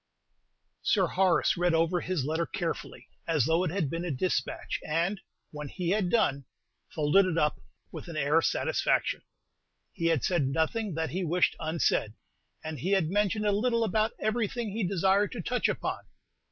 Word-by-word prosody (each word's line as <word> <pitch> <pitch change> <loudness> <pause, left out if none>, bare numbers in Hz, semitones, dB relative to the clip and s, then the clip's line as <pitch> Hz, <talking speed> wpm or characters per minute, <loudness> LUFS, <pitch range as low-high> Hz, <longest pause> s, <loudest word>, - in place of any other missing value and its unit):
Sir 195 -4 +3
Horace 185 0 +2
read 175 -1 +2
over 165 +2 +2
his 180 -8 -2
letter 160 +3 -1
carefully, 170 -2 -4 0.2
as 155 -7 +2
though 165 +4 +2
it 180 - 0
had 180 -2 -1
been 165 +5 -3
a 175 - -3
despatch, 160 +6 -2
and, 175 +6 -1 0.3
when 150 -1 -6
he 180 +1 -3
had 200 -3 +1
done, 140 - +1 0.4
folded 160 +6 +3
it 165 -3 -1
up 150 -2 +1 0.3
with - - -8
an 165 -2 -6
air 150 +2 +3
of - - -1
satisfaction. - - +1 0.7
He 165 - -1
had 165 -5 +2
said 170 -7 +1
nothing 165 +7 -1
that 160 0 -2
he 185 +2 -2
wished 175 +2 +2
unsaid, 155 -9 0 0.5
and 155 -2 -5
he 190 +10 0
had 175 -5 +2
mentioned 210 +1 +1
a 205 - +3
little 230 +3 +1
about 215 +1 +1
everything 220 0 -1
he 215 +2 -2
desired 195 +2 +2
to 240 - -4
touch 250 0 0
upon. - - -2
175 Hz, 175 wpm, -29 LUFS, 160-200 Hz, 0.7 s, Sir